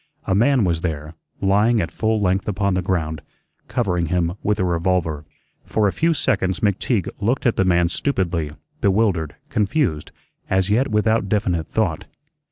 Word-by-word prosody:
A - - 0
man 120 +4 +3
was 85 -3 0
there, 75 -2 -4 0.3
lying 105 +4 +3
at 85 -4 -2
full 110 +2 0
length 95 -1 0
upon 100 -1 0
the 90 - +1
ground, 80 -5 -2 0.5
covering 90 -8 0
him 85 0 0
with 105 +1 0
a 95 - +2
revolver. 85 -3 0 0.4
For 105 -2 +1
a - - +1
few 165 0 +1
seconds 95 -10 0
McTeague 100 0 +1
looked 120 +6 0
at 120 - +3
the 95 - +2
man 85 -1 +3
stupidly, 85 - -1 0.3
bewildered, 95 -7 +1
confused, 105 - 0 0.4
as 95 +1 +1
yet 125 +6 +3
without 110 -1 +1
definite 95 -6 0
thought. 95 -8 -1
95 Hz, 160 wpm, -21 LUFS, 85-110 Hz, 0.5 s, man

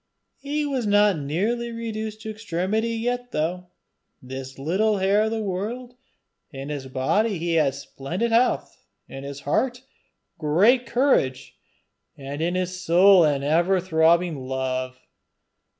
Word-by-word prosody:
He 295 +2 -2
was 265 -6 -2
not 205 -4 +4
nearly 215 +12 -1
reduced 220 -2 -5
to 220 - -5
extremity 215 +1 -2
yet 245 +2 -3
though 175 +4 -2 0.5
this 130 +1 -8
little 195 +10 +1
heir 200 +3 +2
of - - 0
the 220 -1 -2
world: 220 +6 -4 0.6
in 135 -1 -8
his 140 -3 -5
body 190 - 0
he 170 +1 -2
had 150 -5 +2
splendid 165 +11 -4
health, 240 +2 +1 0.2
in 135 - -9
his 140 0 -7
heart 245 - 0
a - - -21 0.6
great 210 - +3
courage, 240 - +1 0.6
and 140 +2 -6
in 175 +2 0
his 185 0 -2
soul 180 +2 +6
an 145 -3 +1
ever 170 +6 +2
throbbing 165 -4 +2
love. 130 -1 -3
185 Hz, 135 wpm, -24 LUFS, 145-220 Hz, 0.6 s, soul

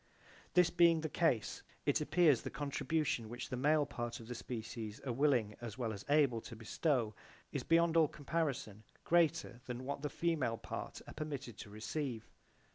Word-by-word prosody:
This 180 -1 +6
being 170 -2 +5
the 155 - -2
case, 140 - +1 0.2
it - - +2
appears 160 -8 +4
the - - -4
contribution 145 -4 -1
which 120 +2 -6
the - - -2
male 150 +4 +3
part 120 -4 -4
of 115 - -10
the 125 - -4
species 110 -2 -5
are 125 - -2
willing 125 -6 +2
as 115 -1 -6
well 115 -4 -1
as 100 - -7
able 140 -6 +4
to 115 - -9
bestow 115 0 0 0.4
is 140 - -2
beyond 165 +3 +3
all 160 -2 +6
comparison 140 -9 -2 0.2
greater 160 -7 +2
than 125 +1 -4
what 140 +1 -3
the 150 - -2
female 150 -10 0
part - - -6
are - - -8
permitted 145 -6 -5
to - - -8
receive. 115 +2 -4
135 Hz, 175 wpm, -36 LUFS, 115-155 Hz, 0.4 s, This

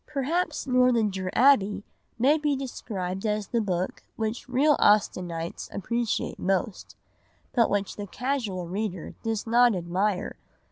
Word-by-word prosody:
Perhaps 305 +3 -1
Northanger 230 -7 +2
Abbey 220 -6 +4 0.3
may 280 +6 +4
be 295 -1 +1
described 195 -8 -4
as 210 -2 -1
the 235 - +1
book 185 -3 -2
which 225 +3 -3
real 285 +4 +4
Austenites 175 -5 +1
appreciate 235 +3 -2
most, 190 +2 -2 0.6
but 235 -3 +3
which 200 -1 -1
the 205 -1 -5
casual 230 -8 -2
reader 190 -1 -4
does 225 -2 -2
not 240 -1 +4
admire. 185 +3 -1
215 Hz, 125 wpm, -26 LUFS, 190-250 Hz, 0.6 s, Abbey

